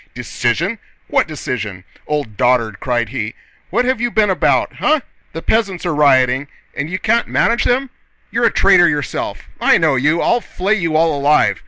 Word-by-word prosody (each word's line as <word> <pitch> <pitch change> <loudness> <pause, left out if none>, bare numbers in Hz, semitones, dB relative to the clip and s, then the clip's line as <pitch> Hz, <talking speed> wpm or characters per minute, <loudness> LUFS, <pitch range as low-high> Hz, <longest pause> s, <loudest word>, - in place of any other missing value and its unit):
"Decision? 125 - -2 0.3
What - - +2
decision? 110 - -5 0.2
Old 145 -8 -3
dotard!..." 120 -3 +1
cried 120 -3 -1
he. 115 -3 -4 0.3
"What 245 - 0
have 255 -2 0
you 240 - +1
been 215 -3 +2
about? 185 - 0
Eh? 305 -1 +2 0.3
The 165 - -6
peasants 200 -6 0
are 175 - 0
rioting, 135 -2 +3 0.3
and 140 +2 -3
you 185 - -2
can't 235 +4 +1
manage 235 +1 +1
them? 255 +1 0 0.4
You're 235 +1 +1
a - - +4
traitor 175 -3 +5
yourself! 145 -2 -3 0.2
I - - +4
know 155 -5 +2
you. 150 +6 +1
I'll 240 +6 +1
flay 195 0 -2
you 170 -7 -1
all 160 -1 +2
alive!..." 140 -9 +2
155 Hz, 175 wpm, -17 LUFS, 125-210 Hz, 0.4 s, traitor